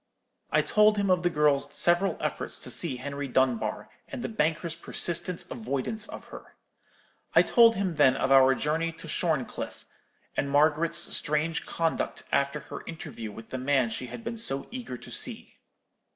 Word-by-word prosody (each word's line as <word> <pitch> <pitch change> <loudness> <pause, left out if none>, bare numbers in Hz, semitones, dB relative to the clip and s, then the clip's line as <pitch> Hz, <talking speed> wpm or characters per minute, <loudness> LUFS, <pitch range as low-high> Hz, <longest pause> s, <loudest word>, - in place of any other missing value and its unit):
I - - +3
told 210 0 +4
him 200 -2 +1
of 180 -1 +3
the 175 - +2
girl's 150 -3 +2
several 175 +3 +3
efforts - - -3
to - - -3
see 165 -7 +1
Henry 140 +2 -5
Dunbar, 125 -4 0 0.2
and 265 -4 -6
the - - -3
banker's 165 -5 0
persistent 170 +1 -1
avoidance 215 - -3
of - - -9
her. - - -12 0.8
I - - +8
told 230 -1 +5
him 185 -5 -2
then 130 -3 +5
of 135 - -1
our 135 -1 +6
journey 160 +4 -1
to 165 0 -11
Shorncliffe, 155 -4 -2 0.5
and 140 - -1
Margaret's 155 +3 +2
strange 155 +2 0
conduct 165 -1 -2
after 140 +1 +1
her - - -9
interview 115 -9 -7
with 110 +2 -12
the 130 - -3
man 130 -3 +1
she 125 +3 -4
had 230 - -8
been 230 0 -5
so 135 -11 -1
eager 240 - -6
to - - -13
see. - - -3
155 Hz, 165 wpm, -28 LUFS, 135-180 Hz, 0.8 s, I